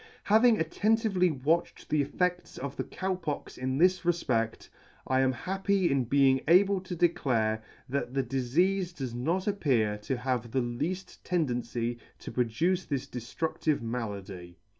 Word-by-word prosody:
Having 220 +2 +5
attentively 205 +1 +2
watched, 155 +4 -1
the 150 -1 +3
effects 180 +5 -1
of 140 0 -5
the - - -2
Cow 190 0 -3
Pox 165 -5 -5
in 130 +1 -2
this 185 +3 +4
refpect, 130 -10 0 0.4
I 130 0 +2
am 130 0 +3
happy 190 - 0
in 135 -2 +1
being 135 +1 +4
able 190 +3 +5
to 185 -1 -6
declare, 125 -10 +1 0.3
that 130 -1 -3
the 135 - +2
difeafe 175 +9 0
does 130 -6 -4
not 165 +10 -1
appear 125 - +1
to 125 +5 -3
have 125 -2 -2
the 130 +3 0
lead; 150 +11 -2 0.2
tendency 120 -7 -1 0.2
to - - -8
produce 125 +11 0
this 140 -4 -2
deftructive 145 +3 -2
malady. 100 -7 -5
140 Hz, 145 wpm, -29 LUFS, 120-180 Hz, 0.4 s, Having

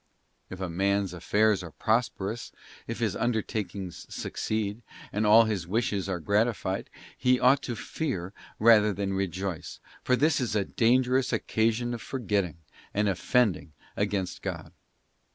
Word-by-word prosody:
* - - -44
If 95 - -8
a 95 - -2
man's 100 +2 0
affairs 105 +3 +2
are 85 - -7
prosperous, 110 - -1 0.4
if - - -4
his - - 0
undertakings 105 -5 -3
succeed, 110 0 -3 0.3
and 105 +1 +1
all 110 +2 +8
his 105 -6 -2
wishes 100 -1 -1
are 90 -2 -1
gratified, 100 +1 0 0.3
he 125 0 +2
ought 135 +2 +5
to 120 - -4
fear 105 - -4 0.2
rather 105 -2 +6
than 100 0 -2
rejoice, 95 -2 -3 0.2
for 125 - +3
this 150 +2 +2
is 115 -4 -1
a 100 -2 +1
dangerous 125 +4 +2
occasion 115 +1 0
of 115 - -5
for 135 - -5
getting, 100 -8 -1 0.4
and 105 +1 +2
offending 100 -5 +1 0.2
against, 100 -3 -2
God. - - -5
105 Hz, 145 wpm, -28 LUFS, 95-120 Hz, 0.4 s, all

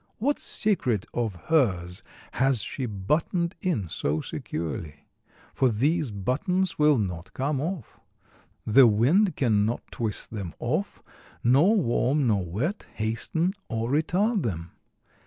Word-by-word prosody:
What 285 +6 0
secret 125 - -1
of 115 -5 -1 0.2
hers 90 - +1 0.3
has 130 -5 +2
she 130 -3 -4
buttoned 155 - -1
in 160 - -1
so 75 -1 -1
securely? 75 -2 -5 0.5
for 130 - +3
these 145 +7 +1
buttons 155 - -1
will 150 -2 +5
not 90 -5 -3
come 135 +1 -1
off. 165 - -5 0.7
The 120 +3 +7
wind 145 - +3
can 110 -6 +2
not 115 +3 -1
twist 110 -3 -3
them 100 -7 -5
off, - - -2 0.4
nor 145 - +5
warm 140 - +2
nor 105 -5 +2
wet 120 - -3
hasten 115 - -1 0.2
or 115 +2 -2
retard 185 +9 +1
them. 85 - -4
125 Hz, 125 wpm, -26 LUFS, 105-160 Hz, 0.7 s, The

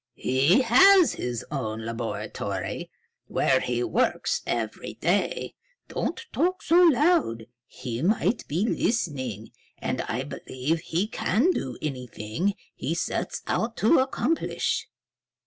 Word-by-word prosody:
"He 140 - +3
has 355 - +6
his 120 -2 -4
own 110 -6 -3
laboratory, 115 0 -4 0.4
where - - +2
he 120 -1 -1
works 255 - 0
every - - -3
day. - - 0 0.4
Don't - - -3
talk 365 +2 0
so 340 +3 +5
loud. 305 - +3 0.2
He 120 -3 -5
might 215 +6 +1
be 170 +8 0
listening. 130 - -1 0.3
And - - -2
I - - -3
believe 140 +6 -3
he 170 +3 -1
can 230 - +1
do 130 - -3
anything 130 - -3 0.2
he 150 +6 -3
sets 170 - -2
out 225 +1 -1
to 265 - +6
accomplish." 265 +4 0
170 Hz, 115 wpm, -26 LUFS, -, 0.4 s, has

